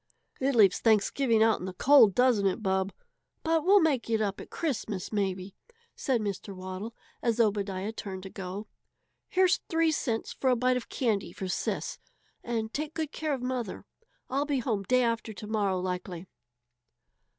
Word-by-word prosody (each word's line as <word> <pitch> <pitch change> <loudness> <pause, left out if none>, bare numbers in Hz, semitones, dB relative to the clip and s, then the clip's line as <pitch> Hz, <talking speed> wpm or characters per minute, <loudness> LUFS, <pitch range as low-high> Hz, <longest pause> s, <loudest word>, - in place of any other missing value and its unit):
"It 270 0 +1
leaves 200 -5 +5
Thanksgiving 225 +2 +3
out 225 -1 +3
in 180 - -5
the 185 - -6
cold, 255 -4 +6
doesn't 245 -6 +4
it, 195 +4 -2
Bub? 190 0 +1 0.5
But 325 -1 +2
we'll 400 +3 +6
make 290 -9 +1
it 225 -1 +2
up 205 -2 -1
at - - -11
Christmas, 220 - -3
maybe," 190 -2 -2 0.4
said 255 -4 0
Mr. 200 -1 -4
Waddle, 185 +5 -6 0.3
as 235 -1 0
Obadiah 200 -2 0
turned 190 -4 -7
to 190 - -8
go. 195 +2 -6 0.6
"Here's 370 0 +4
three 325 -1 +3
cents 235 -7 -2
for 265 - 0
a 250 - +4
bite 250 +1 +2
of 250 - -4
candy 225 -7 -1
for 190 - -5
Sis, 185 - -2 0.4
and 225 -2 -3
take 305 +2 -4
good 315 -2 -2
care 310 -2 -1
of 255 - -8
mother. 250 -2 -3 0.4
I'll 275 +2 0
be 285 -2 +1
home 230 -5 -1
day 255 +6 +2
after 230 -1 -1
to 210 - -8
morrow, 205 -3 0
likely." 180 -1 -4
225 Hz, 175 wpm, -29 LUFS, 195-260 Hz, 0.6 s, cold